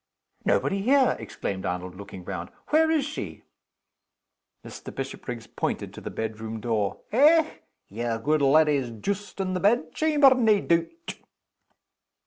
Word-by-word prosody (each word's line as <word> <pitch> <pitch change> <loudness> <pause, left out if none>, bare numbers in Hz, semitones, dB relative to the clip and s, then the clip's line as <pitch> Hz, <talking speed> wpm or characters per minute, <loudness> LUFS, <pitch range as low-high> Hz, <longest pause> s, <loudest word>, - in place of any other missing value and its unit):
"Nobody 195 0 +1
here!" 265 +3 +4
exclaimed 95 -1 -5
Arnold, 90 -1 -3
looking 95 -1 -10
round. 85 +1 -5 0.2
"Where 320 +1 +4
is 310 -4 +2
she?" 300 - -6 1.2
Mr. - - -9
Bishopriggs 125 -3 -6
pointed - - -3
to - - -10
the - - -5
bedroom 110 0 -5
door. 105 -3 -1
"Eh! 310 +6 +6 0.4
yer 115 +2 -3
good 150 +6 +1
leddy's 140 -2 +4
joost 200 - -4
in 185 -1 -1
the 185 - -1
bedchamber, 265 - +4
nae 220 -5 +3
doot!" 170 - -1
155 Hz, 125 wpm, -26 LUFS, -, 1.2 s, Eh